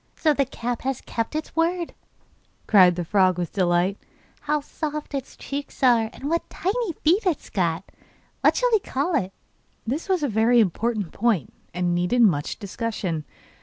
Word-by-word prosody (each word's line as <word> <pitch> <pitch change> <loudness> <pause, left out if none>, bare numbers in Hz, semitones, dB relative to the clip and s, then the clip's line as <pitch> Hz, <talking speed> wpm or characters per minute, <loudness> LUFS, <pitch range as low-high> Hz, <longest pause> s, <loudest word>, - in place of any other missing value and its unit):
'So 310 -2 +3
the 275 -1 +1
cap 240 -2 -4
has 265 -1 -2
kept 230 +5 -3
its 310 0 -4
word,' 340 +1 0 0.7
cried 185 -4 +6
the 175 -1 -3
frog 185 0 +3
with 175 -2 -3
delight. 180 +1 +1 0.4
'How 300 0 0
soft 300 +1 -5
its 270 -2 -5
cheeks 280 0 -6
are, 235 -3 +4
and 275 - -7
what 335 +2 -1
tiny 405 0 -1
feet 355 +8 +4
it 335 -6 +2
has - - -17
got! 170 -2 0 0.6
What - - +4
shall - - +2
we 440 - +5
call 315 0 -2
it?' 195 -11 0 0.5
This 285 - -3
was 370 -5 +1
a - - +2
very 230 +1 +3
important 215 -1 0
point, 205 - 0 0.2
and 175 0 0
needed 180 +8 +2
much 150 -9 +2
discussion. 200 -6 -3
235 Hz, 170 wpm, -24 LUFS, 185-300 Hz, 0.7 s, cried